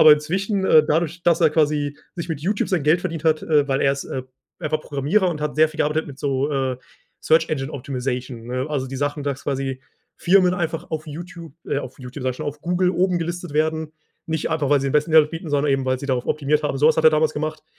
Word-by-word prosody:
Aber 155 Hz, -, +9 dB
inzwischen 190 Hz, +7 st, 0 dB
äh, 155 Hz, -4 st, +6 dB
dadurch, 165 Hz, +2 st, 0 dB
dass 170 Hz, -1 st, +3 dB
er 160 Hz, -2 st, +5 dB
quasi 150 Hz, -2 st, +1 dB, 0.2 s
sich 170 Hz, -1 st, -5 dB
mit 160 Hz, -4 st, -3 dB
Youtube 200 Hz, +7 st, -1 dB
sein 175 Hz, -7 st, 0 dB
Geld 155 Hz, +3 st, +4 dB
verdient 165 Hz, -3 st, -4 dB
hat, 155 Hz, -1 st, +2 dB
äh, 150 Hz, -3 st, +2 dB
weil 135 Hz, -1 st, 0 dB
er 135 Hz, -, +3 dB
ist, 140 Hz, -, -5 dB
äh, 130 Hz, -, -4 dB, 0.4 s
einfach 155 Hz, 0 st, -1 dB
Programmierer 150 Hz, +9 st, +1 dB
und 155 Hz, -4 st, -3 dB
hat 150 Hz, 0 st, -3 dB
sehr 155 Hz, 0 st, +5 dB
viel 155 Hz, +1 st, -13 dB
gearbeitet 155 Hz, +1 st, 0 dB
mit 135 Hz, -2 st, -10 dB
so, 140 Hz, +1 st, 0 dB
äh, 130 Hz, -2 st, -1 dB, 0.4 s
Search 160 Hz, +1 st, +3 dB
Engine 135 Hz, -1 st, -3 dB
Optimization, 125 Hz, -3 st, -4 dB
ne? 125 Hz, +2 st, -2 dB
Also, 140 Hz, -3 st, -2 dB
die 135 Hz, -, -7 dB
Sachen, 145 Hz, +1 st, -2 dB
dass 140 Hz, -1 st, -3 dB
quasi 135 Hz, -2 st, -3 dB, 0.4 s
Firmen 180 Hz, 0 st, +4 dB
einfach 170 Hz, -2 st, -3 dB
auf 155 Hz, -1 st, -3 dB
Youtube 170 Hz, 0 st, -9 dB, 0.2 s
äh, -, -, 0 dB
auf 130 Hz, -2 st, -8 dB
Youtube, 130 Hz, +1 st, -8 dB
sage 130 Hz, -, 0 dB
ich -, -, -13 dB
schon, -, -, -5 dB
auf 145 Hz, 0 st, -5 dB
Google 180 Hz, +2 st, +1 dB
oben 180 Hz, 0 st, +1 dB
gelistet 175 Hz, -1 st, -4 dB
werden. 155 Hz, 0 st, 0 dB, 0.3 s
Nicht 160 Hz, -1 st, -2 dB
einfach, 155 Hz, -3 st, 0 dB
weil 145 Hz, -1 st, +4 dB
sie 135 Hz, -, -2 dB
den -, -, -3 dB
besten 150 Hz, +2 st, +2 dB
Mehrwert 155 Hz, -1 st, +5 dB
bieten, 165 Hz, -1 st, -6 dB
sondern 145 Hz, 0 st, +2 dB
eben, 135 Hz, -1 st, 0 dB
weil 130 Hz, 0 st, 0 dB
sie 140 Hz, -, -6 dB
darauf 125 Hz, -3 st, -1 dB
optimiert 150 Hz, 0 st, +1 dB
haben. 150 Hz, -2 st, -1 dB
Sowas 155 Hz, +3 st, +4 dB
hat 160 Hz, -, +2 dB
er 160 Hz, -, +9 dB
damals 155 Hz, 0 st, +2 dB
gemacht, 155 Hz, +1 st, -4 dB
150 Hz, 245 wpm, -22 LUFS, 140-165 Hz, 0.4 s, Aber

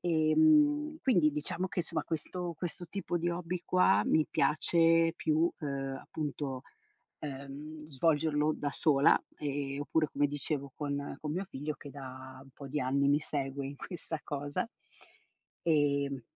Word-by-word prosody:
Ehm, 295 Hz, -, +4 dB
quindi 175 Hz, -, +4 dB
diciamo 150 Hz, +5 st, -2 dB
che, 185 Hz, -, -6 dB
insomma, 165 Hz, -1 st, -3 dB
questo 175 Hz, +2 st, -3 dB
questo 175 Hz, 0 st, -5 dB
tipo 175 Hz, 0 st, -3 dB
di 175 Hz, +1 st, 0 dB
hobby 175 Hz, +1 st, -3 dB
qua 180 Hz, -, +4 dB
mi 155 Hz, -1 st, +3 dB
piace 165 Hz, +3 st, +3 dB
più, 160 Hz, +2 st, +2 dB
uhm, 135 Hz, -2 st, -3 dB
appunto, 145 Hz, -3 st, -4 dB, 0.6 s
uhm, 145 Hz, +2 st, -7 dB
svolgerlo 150 Hz, +1 st, +2 dB
da 145 Hz, -, -2 dB
sola, 140 Hz, -1 st, +4 dB, 0.2 s
ehm, 140 Hz, -1 st, -3 dB
oppure, 155 Hz, +1 st, +1 dB
come 145 Hz, +1 st, +2 dB
dicevo, 140 Hz, -1 st, -3 dB
con 140 Hz, -1 st, -3 dB
con 150 Hz, 0 st, -3 dB
mio 185 Hz, +4 st, -2 dB
figlio 150 Hz, -2 st, -4 dB
che 140 Hz, +1 st, -10 dB
da 130 Hz, -1 st, -9 dB
un 135 Hz, -, -15 dB
po' 140 Hz, 0 st, -9 dB
di 150 Hz, +2 st, -2 dB
anni 140 Hz, +2 st, +2 dB
mi 145 Hz, +1 st, +4 dB
segue 140 Hz, -2 st, -3 dB
in 140 Hz, -, -7 dB
questa 160 Hz, 0 st, -5 dB
cosa, 145 Hz, +9 st, -3 dB, 1.0 s
ehm 140 Hz, -4 st, +2 dB
150 Hz, 145 wpm, -32 LUFS, 140-165 Hz, 1.0 s, Ehm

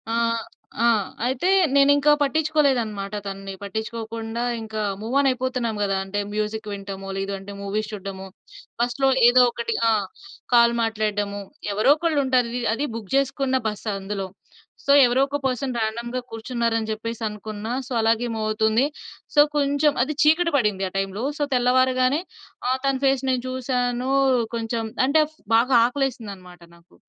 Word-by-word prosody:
ఆహ్, 230 Hz, -1 st, 0 dB, 0.4 s
ఆ! -, -, +5 dB, 0.4 s
అయితే 260 Hz, +8 st, 0 dB, 0.3 s
నేనింకా 285 Hz, +1 st, +5 dB
పట్టించుకోలేదు 300 Hz, -2 st, +2 dB
అన్నమాట 205 Hz, -2 st, -6 dB
తనని. 195 Hz, 0 st, -6 dB
పట్టించుకోకుండా 225 Hz, +2 st, -4 dB, 0.2 s
ఇంకా 220 Hz, -1 st, -5 dB, 0.2 s
మూవ్ 230 Hz, +4 st, -4 dB
ఆన్ 280 Hz, -, +3 dB
అయిపోతున్నాం 255 Hz, -3 st, -1 dB
గదా! 195 Hz, -1 st, +1 dB
అంటే 195 Hz, +1 st, -3 dB
మ్యూజిక్ 215 Hz, +1 st, -3 dB
వినటము 195 Hz, -1 st, -7 dB
లేదంటే 195 Hz, 0 st, -4 dB
మూవీస్ 210 Hz, +2 st, -3 dB
చూడటము. 195 Hz, -2 st, -7 dB, 0.6 s
బస్‌లొ 245 Hz, +3 st, +1 dB, 0.2 s
ఏదో 250 Hz, +1 st, +6 dB
ఒకటి 460 Hz, -, -3 dB, 0.2 s
ఆ! -, -, +4 dB, 0.6 s
కాల్ 235 Hz, 0 st, +6 dB
మాట్లాడడము. 210 Hz, -2 st, -1 dB, 0.3 s
ఎవరోకళ్ళు 295 Hz, +9 st, +3 dB
ఉంటారు. 255 Hz, -2 st, +2 dB
వి 245 Hz, -, -2 dB
అది 280 Hz, +6 st, -1 dB
బుక్ 215 Hz, -4 st, -7 dB
చేసుకున్న 275 Hz, -1 st, +1 dB
బస్ 210 Hz, +1 st, -5 dB
అందులో. 195 Hz, 0 st, -4 dB, 0.6 s
సో 280 Hz, -, +3 dB
ఎవరో 245 Hz, +2 st, +2 dB
ఒక 285 Hz, -, -2 dB
పర్సన్ 255 Hz, 0 st, -2 dB
రాండమ్‌గా 235 Hz, +3 st, -2 dB
కూర్చున్నారు 230 Hz, 0 st, -2 dB
అని 220 Hz, -1 st, -5 dB
చెప్పేసి 230 Hz, +1 st, -5 dB
అనుకున్న. 210 Hz, 0 st, -7 dB, 0.2 s
సో -, -, -14 dB
అలాగే 225 Hz, +2 st, +2 dB
మూవ్ 215 Hz, -1 st, -2 dB
అవుతుంది. 220 Hz, +3 st, +2 dB, 0.5 s
సో 290 Hz, -, +8 dB, 0.2 s
కొంచెం 285 Hz, +1 st, +2 dB
అది 300 Hz, +3 st, -3 dB
చీకటి 325 Hz, +2 st, +3 dB
పడింది 210 Hz, -6 st, 0 dB
ఆ -, -, -24 dB
టైమ్‌లొ. 195 Hz, +3 st, -2 dB, 0.2 s
సో -, -, +1 dB
తెల్లవారగానే 255 Hz, +3 st, +3 dB, 0.5 s
ఆహ్, 260 Hz, +1 st, +1 dB
తన 275 Hz, 0 st, +2 dB
ఫేస్ 270 Hz, -1 st, +2 dB
నేను 250 Hz, -1 st, -1 dB
చూసాను. 250 Hz, 0 st, -1 dB, 0.4 s
కొంచెం 230 Hz, 0 st, -2 dB, 0.2 s
అంటే 310 Hz, +3 st, +4 dB, 0.3 s
బాగా 245 Hz, +3 st, +3 dB
ఆకలేసింది 255 Hz, -5 st, -3 dB
అన్నమాట 180 Hz, -2 st, -15 dB
నాకు. 170 Hz, +1 st, -23 dB
235 Hz, 145 wpm, -23 LUFS, 210-260 Hz, 0.6 s, సో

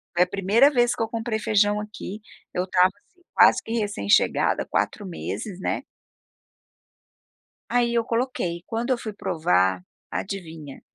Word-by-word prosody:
Foi 175 Hz, -, +5 dB
a -, -, -3 dB
primeira 200 Hz, +9 st, +4 dB
vez 240 Hz, -3 st, +2 dB
que -, -, -5 dB
eu -, -, -2 dB
comprei 225 Hz, -1 st, -2 dB
feijão, 210 Hz, 0 st, +2 dB
aqui. 210 Hz, 0 st, -7 dB, 0.3 s
Eu 180 Hz, -, 0 dB
estava, 185 Hz, 0 st, +3 dB
assim, 360 Hz, -, -33 dB
quase -, -, +6 dB
que, -, -, -8 dB
recém-chegada. 205 Hz, -, +2 dB
4 205 Hz, -, -1 dB
meses, 185 Hz, +2 st, -5 dB
né. -, -, -2 dB, 1.9 s
Aí, 240 Hz, -1 st, +2 dB
eu 235 Hz, -1 st, +2 dB
coloquei. 230 Hz, -8 st, -2 dB
Quando 230 Hz, +2 st, -3 dB
eu 255 Hz, -, +2 dB
fui 220 Hz, -2 st, -6 dB
provar, 95 Hz, -, +1 dB, 0.3 s
adivinha? 165 Hz, -7 st, -6 dB
205 Hz, 140 wpm, -24 LUFS, 180-230 Hz, 1.9 s, quase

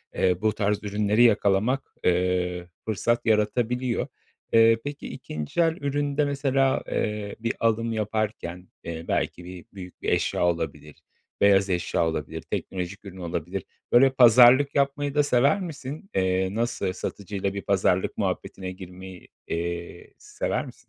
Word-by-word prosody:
eee, 90 Hz, -1 st, +1 dB
bu 110 Hz, -1 st, +2 dB
tarz 105 Hz, 0 st, -1 dB
ürünleri 105 Hz, +3 st, +2 dB
yakalamak, 110 Hz, +3 st, +2 dB
eee, 90 Hz, 0 st, +1 dB, 0.2 s
fırsat 120 Hz, +2 st, 0 dB
yaratabiliyor. 120 Hz, +3 st, +1 dB, 0.5 s
Eee, 115 Hz, 0 st, +6 dB
peki, 145 Hz, 0 st, -6 dB
2'nci 75 Hz, -, -4 dB
el 165 Hz, -1 st, +2 dB
üründe 145 Hz, +1 st, 0 dB
mesela, 135 Hz, -1 st, +1 dB
eee, 105 Hz, -1 st, -2 dB
bir 115 Hz, +1 st, -1 dB
alım 115 Hz, 0 st, +1 dB
yaparken, 105 Hz, -5 st, -3 dB, 0.2 s
eee, 85 Hz, 0 st, -6 dB
belki 90 Hz, -, -1 dB
bir 90 Hz, -1 st, -9 dB
büyük 90 Hz, -2 st, -10 dB
bir -, -, -1 dB
eşya -, -, +1 dB
olabilir. 85 Hz, -4 st, -2 dB, 0.5 s
Beyaz 100 Hz, -1 st, +5 dB
eşya 85 Hz, -1 st, 0 dB
olabilir. 80 Hz, -, -4 dB
Teknolojik 95 Hz, +2 st, -5 dB
ürün 95 Hz, -1 st, -9 dB
olabilir. 90 Hz, +1 st, -4 dB, 0.3 s
Böyle 135 Hz, +3 st, +7 dB
pazarlık 125 Hz, +3 st, +7 dB
yapmayı 140 Hz, +1 st, 0 dB
da 145 Hz, -, +4 dB
sever 140 Hz, +9 st, +3 dB
misin? 155 Hz, +1 st, -7 dB
Eee. 95 Hz, 0 st, +1 dB
nasıl 115 Hz, -5 st, -1 dB
satıcıyla 100 Hz, +1 st, -4 dB
bir 100 Hz, -, -4 dB
pazarlık 95 Hz, -2 st, +1 dB
muhabbetine 95 Hz, -1 st, -3 dB
girmeyi, 95 Hz, 0 st, -11 dB, 0.2 s
eee, 85 Hz, +1 st, -5 dB
sever -, -, -3 dB
misin? -, -, -11 dB
105 Hz, 135 wpm, -25 LUFS, 90-125 Hz, 0.5 s, Böyle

